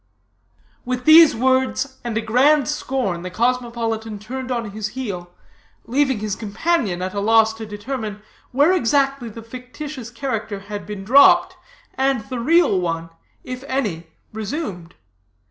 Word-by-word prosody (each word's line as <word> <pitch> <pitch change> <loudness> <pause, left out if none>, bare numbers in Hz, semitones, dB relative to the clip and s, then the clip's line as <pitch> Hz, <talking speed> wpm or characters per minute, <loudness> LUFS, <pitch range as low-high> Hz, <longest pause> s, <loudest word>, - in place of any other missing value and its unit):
With 250 0 -3
these 315 -1 +8
words 260 +2 0
and 235 -2 -3
a - - +1
grand 260 +6 +3
scorn 260 -11 -2
the 185 - -5
cosmopolitan 230 0 -1
turned 255 +5 -6
on 235 -4 -2
his 215 0 -4
heel, 185 -9 -4 0.6
leaving 265 -2 +1
his 210 -2 -2
companion 220 - -1
at 185 0 -4
a 200 - -2
loss 220 +1 +4
to 220 -1 -8
determine 210 0 -5 0.3
where 290 +8 +4
exactly 275 -5 +1
the 225 +1 -10
fictitious 255 +2 -8
character 225 -5 -4
had 205 +1 -7
been 205 -2 -6
dropped, 275 +8 +6 0.4
and 265 -3 +1
the 255 - -3
real 310 - +3
one, 165 -1 -3 0.3
if 255 +1 -7
any, 205 -12 -2 0.3
resumed. 210 - -5
235 Hz, 140 wpm, -21 LUFS, 210-265 Hz, 0.6 s, these